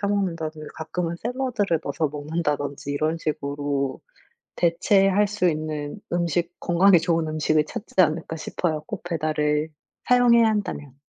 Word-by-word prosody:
사 200 Hz, -, 0 dB
먹는다든지 165 Hz, -6 st, -2 dB
가끔은 165 Hz, +2 st, -3 dB
샐러드를 235 Hz, -, 0 dB
넣어서 155 Hz, -2 st, -1 dB
먹는다든지 145 Hz, -1 st, -3 dB
이런 155 Hz, +3 st, 0 dB
식으로 140 Hz, -3 st, -2 dB, 0.6 s
대체할 195 Hz, +4 st, +3 dB
수 200 Hz, -4 st, +1 dB
있는 155 Hz, +2 st, -4 dB
음식, 170 Hz, 0 st, 0 dB
건강에 175 Hz, +2 st, +5 dB
좋은 165 Hz, -1 st, +1 dB
음식을 155 Hz, 0 st, +1 dB
찾지 230 Hz, +7 st, -8 dB
않을까 160 Hz, -1 st, 0 dB
싶어요, 155 Hz, -1 st, -2 dB
꼭 -, -, -6 dB
배달을 155 Hz, -2 st, 0 dB, 0.4 s
사용해야 240 Hz, -2 st, +6 dB
한다면. 150 Hz, -11 st, -3 dB
165 Hz, 330 characters per minute, -24 LUFS, 150-190 Hz, 0.6 s, 사용해야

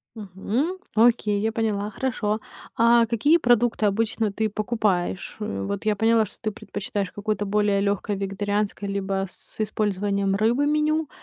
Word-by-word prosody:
Мгм, 220 Hz, -, -2 dB, 0.2 s
окей, 220 Hz, -3 st, +3 dB
я 220 Hz, +1 st, 0 dB
поняла, 215 Hz, -2 st, -1 dB
хорошо. 215 Hz, -2 st, -1 dB, 0.4 s
А 235 Hz, 0 st, +5 dB
какие 285 Hz, +9 st, +3 dB
продукты 240 Hz, -5 st, +2 dB
обычно 220 Hz, +1 st, 0 dB
ты 220 Hz, +2 st, 0 dB
покупаешь? 205 Hz, -4 st, -1 dB
Вот 205 Hz, -1 st, -3 dB
я 210 Hz, -1 st, +2 dB
поняла, 225 Hz, +1 st, +3 dB
что 200 Hz, -, -15 dB
ты 215 Hz, -, -2 dB
предпочитаешь 200 Hz, -1 st, -4 dB
какое-то 205 Hz, 0 st, -2 dB
более 205 Hz, -1 st, +2 dB
лёгкое 200 Hz, 0 st, 0 dB
вегетарианское 205 Hz, +1 st, -2 dB
либо 195 Hz, -1 st, -1 dB
с -, -, -14 dB
использованием 200 Hz, -2 st, 0 dB
рыбы 235 Hz, +7 st, +2 dB
меню. 305 Hz, 0 st, +1 dB
210 Hz, 140 wpm, -24 LUFS, 200-230 Hz, 0.4 s, А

